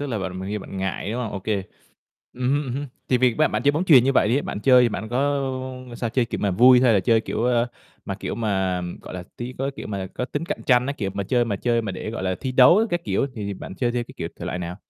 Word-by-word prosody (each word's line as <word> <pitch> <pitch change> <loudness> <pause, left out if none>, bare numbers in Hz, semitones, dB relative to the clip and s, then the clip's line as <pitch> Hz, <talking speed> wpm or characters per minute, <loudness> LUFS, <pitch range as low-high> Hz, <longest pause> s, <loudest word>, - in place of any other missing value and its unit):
tức 145 - -2
là 115 -5 -2
bạn 95 -1 -4
mà 95 - -5
nghi 105 +1 -2
bạn 95 - -9
ngại, 95 +2 -3
đúng 125 - -2
hông? 115 -4 -4
Ô 100 - -3
kê. 100 -1 -1 0.7
Ừm 125 +1 -1
hưm, 145 +1 +1
ừm 125 - -4
hưm, 145 +2 -3 0.2
tại 125 - +3
vì 125 -2 +3
ba - - +3
bạn 105 +2 -2
chơi 145 - +4
bóng 160 +5 0
chuyền 135 -8 +7
như 135 - +2
vậy 105 - +3
đi, 135 +5 +2
bạn 105 - -5
chơi 125 0 +6
bạn 110 0 -5
có, 120 +3 -1 0.7
ơ, - - -8
sao 120 -1 -3
chơi, 125 +1 +2
kiểu, 115 - -5
mà 100 - +2
vui 125 +6 +6
hay 125 -3 +5
là 100 - +4
chơi, 115 +4 +3
kiểu, 115 - -3
ơ, 120 -1 +2 0.4
mà, - - -3
kiểu, - - -5
mà, 95 -5 0
ừm, 90 0 -6
gọi - - -10
là, 90 - -5
tí 120 +1 -5
có 135 - -1
cái 140 - -1
kiểu - - -6
mà 100 -2 -4
có 125 - -2
tính 145 +5 -4
cạnh 200 +4 -4
tranh 125 -1 +4
á, 140 - -1
kiểu, 100 -8 -3
mà 100 - -2
chơi 120 +4 +2
mà 105 -4 -2
chơi 115 +2 0
mà 100 -3 -4
để, 100 +4 -5
gọi 115 - -5
là, 95 -1 0
thi 130 - -3
đấu 130 +10 +7
các 175 -1 -1
kiểu 100 +7 0
thì 100 -3 -4
bạn 95 - -8
chơi 120 +3 0
theo 120 - -1
cái, - - -14
kiểu, 85 - -4
thể - - -7
loại 90 - -3
nào? 90 0 -5
115 Hz, 315 wpm, -23 LUFS, 100-125 Hz, 0.7 s, chuyền